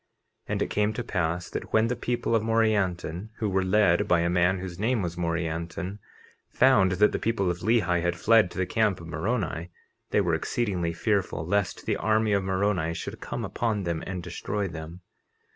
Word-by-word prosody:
50:28 - - -6
And - - -1
it - - -4
came 105 +1 +1
to 120 - -3
pass 85 -3 -2
that - - -6
when 110 0 +4
the 125 - -1
people 120 -1 -2
of 115 - +3
Morianton, 105 -5 0
who 110 - -1
were 95 -1 +1
led 95 -2 +3
by 85 -1 +3
a 85 +1 +1
man 90 +2 +3
whose 90 -1 -7
name 115 0 +1
was 85 -1 -3
Morianton, 85 +3 -3 0.5
found 100 -8 +4
that 105 +3 +4
the - - -2
people 100 -5 0
of 85 - -5
Lehi 95 -7 +2
had 85 0 0
fled 110 0 +4
to - - -11
the 95 - +1
camp 105 -1 +1
of 85 - -10
Moroni, 90 -2 -2 0.4
they - - +2
were - - +1
exceedingly 95 -8 -1
fearful 90 -3 -1
lest 100 +1 -1
the - - 0
army 110 -1 +2
of 100 -1 +2
Moroni 95 -3 0
should 85 - -6
come - - -4
upon 110 -4 -1
them 85 -2 -2
and 90 -2 -4
destroy 100 +3 -3
them. 80 +1 -8
95 Hz, 195 wpm, -27 LUFS, 85-110 Hz, 0.5 s, when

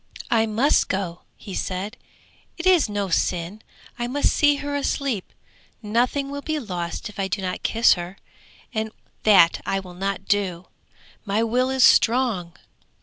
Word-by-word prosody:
'I 225 -1 +3
must 230 +7 +2
go,' 185 -3 -3 0.2
he 200 - -9
said, 195 +6 -3 0.6
'it 340 - -5
is 360 -10 +4
no 205 -2 -2
sin; 180 +4 -1 0.4
I 240 - -1
must 285 +4 +1
see 290 -1 +4
her 285 0 -4
asleep; 275 -7 -2 0.5
nothing 245 +6 0
will 285 0 -5
be 310 +1 -2
lost 180 - -4
if 210 -1 -11
I 195 - 0
do 190 +2 -2
not 185 -1 -3
kiss 230 +1 +4
her, 175 +2 -6 0.6
and 220 -1 -2 0.3
that 190 -5 +5
I 195 - -1
will 185 -2 -10
not 195 +1 -3
do. 190 -4 -1 0.6
My 210 +2 0
will 250 +3 +1
is 265 -1 +2
strong.' 225 -10 +3
215 Hz, 155 wpm, -23 LUFS, 190-255 Hz, 0.6 s, that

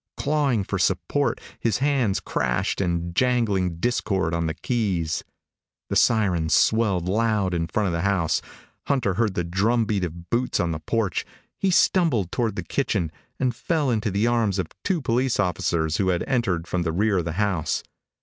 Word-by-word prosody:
Clawing 140 -7 +1
for - - -3
support, - - 0 0.2
his 115 -4 +1
hands 130 -7 +1
crashed 60 +8 -1
in 85 -1 -1
jangling 105 -7 +1
discord 95 -4 0
on 85 -1 0
the 80 - -3
keys. 95 -10 -1 0.7
The - - 0
siren 95 -8 +3
swelled 100 -3 +3
loud 105 -2 +1
in 85 -1 -1
front 105 +6 0
of 90 - 0
the 85 - -1
house. 95 -4 +1 0.5
Hunter 130 -9 +1
heard 110 0 0
the 90 - 0
drum 105 +7 +1
beat 100 -3 -1
of 85 0 -6
boots 125 +1 +1
on 85 -1 +1
the 80 - -3
porch. 100 +1 -1 0.4
He 195 - +2
stumbled 160 - +3
toward 115 -3 -1
the 90 - -3
kitchen 95 - -1 0.3
and 130 -2 +1
fell 150 0 0
into 110 -1 0
the 100 +3 +1
arms 115 -5 +1
of 90 -4 -2
two 180 -4 0
police 125 +1 +1
officers 85 -3 0
who 95 - +1
had 90 -2 +1
entered 115 -11 0
from 90 0 -2
the 80 -1 -1
rear 100 +3 +2
of 85 - -3
the 80 - -3
house. 95 -3 0
100 Hz, 180 wpm, -24 LUFS, 85-120 Hz, 0.7 s, siren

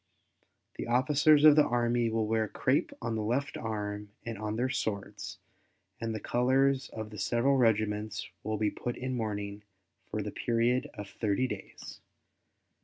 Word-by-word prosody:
The - - -4
officers 145 +4 +4
of 150 -1 +9
the 150 -1 +5
Army 120 -1 +1
will 110 -1 0
wear 110 0 +1
crape - - +1
on 115 - -1
the 110 - -1
left 130 +8 -1
arm 105 -2 -4 0.2
and 115 -1 -4
on 105 +1 -3
their 125 +3 +1
swords 105 -6 -3 0.6
and 115 -1 -2
the - - -3
colors 130 +4 +2
of 110 -1 -7
the 105 - -8
several 125 +4 +2
regiments 110 -2 +1 0.2
will 110 0 -1
be 105 0 +1
put 120 - -4
in 130 0 -3
mourning 105 -3 -3 0.5
for - - -2
the - - -4
period 120 +2 +1
of 105 -1 -6
thirty 105 +4 0
days. 130 - -7
115 Hz, 160 wpm, -30 LUFS, 105-125 Hz, 0.6 s, of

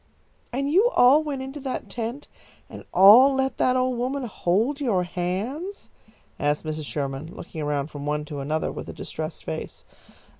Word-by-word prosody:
"And 275 +3 -1
you 405 +9 +5
all 265 +5 +6
went 280 -3 -4
into 270 +2 -7
that 265 -2 -4
tent 240 +5 -5 0.4
and - - -9
all 230 +9 +8
let 265 0 -1
that 255 - +3
old 255 -1 0
woman 265 +3 -2
hold 230 - 0
your 205 -10 +1
hands?" 205 - -4 0.5
asked 145 +2 0
Mrs. 155 -1 -4
Sherman, 145 +4 -4
looking 160 - -7
around 145 0 -2
from 145 0 -6
one 150 0 -1
to 145 -1 -6
another 155 +3 -1
with - - -7
a - - -6
distressed 155 0 -6
face. 80 - -6
220 Hz, 165 wpm, -25 LUFS, -, 0.5 s, all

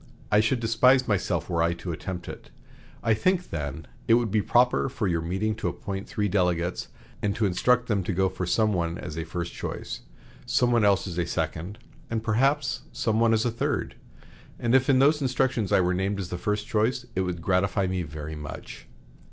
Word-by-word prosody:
I 105 - +5
should 110 +4 +2
despise 125 +3 +4
myself 105 -5 0
were 85 -2 0
I 85 +1 +2
to 85 +1 -5
attempt 90 +2 -5
it. - - -9 0.5
I 115 - +3
think, 180 - 0
then, 75 -1 -4 0.2
it 115 - +6
would 120 -3 +1
be 105 0 +3
proper 125 +4 +3
for 120 -3 -3
your 85 -2 0
meeting 95 +6 -1
to 90 - -2
appoint 95 +3 -5
three 105 -6 0
delegates, 90 -2 0 0.3
and 100 -1 0
to 110 - +1
instruct 120 +6 +2
them 100 -4 0
to - - -1
go 95 +1 +2
for 90 -1 -4
some 110 +2 +2
one 85 -1 -1
as 75 - -7
a 80 - -3
first 85 +2 -4
choice, - - -5 0.4
some 125 -1 +2
one 120 -2 +3
else 100 -2 +3
as 90 -1 -4
a 85 - 0
second, 90 +6 -3 0.3
and 115 -1 -2
perhaps 135 +5 +1
some 110 -1 0
one 115 0 +4
as 110 +1 +2
a 120 - +1
third; 115 - -2 0.6
and 120 0 0
if 130 +1 +4
in 135 - +5
those 145 +3 +4
instructions 130 -5 0
I - - +5
were 90 0 +1
named 95 +2 -1
as 90 -3 -4
the 90 - -3
first 105 +1 -1
choice 115 +3 0
it 95 - +1
would 90 -2 -2
gratify 95 +3 +1
me 95 0 -1
very 75 -1 -6
much. 75 -2 -8
105 Hz, 210 wpm, -26 LUFS, 90-115 Hz, 0.6 s, it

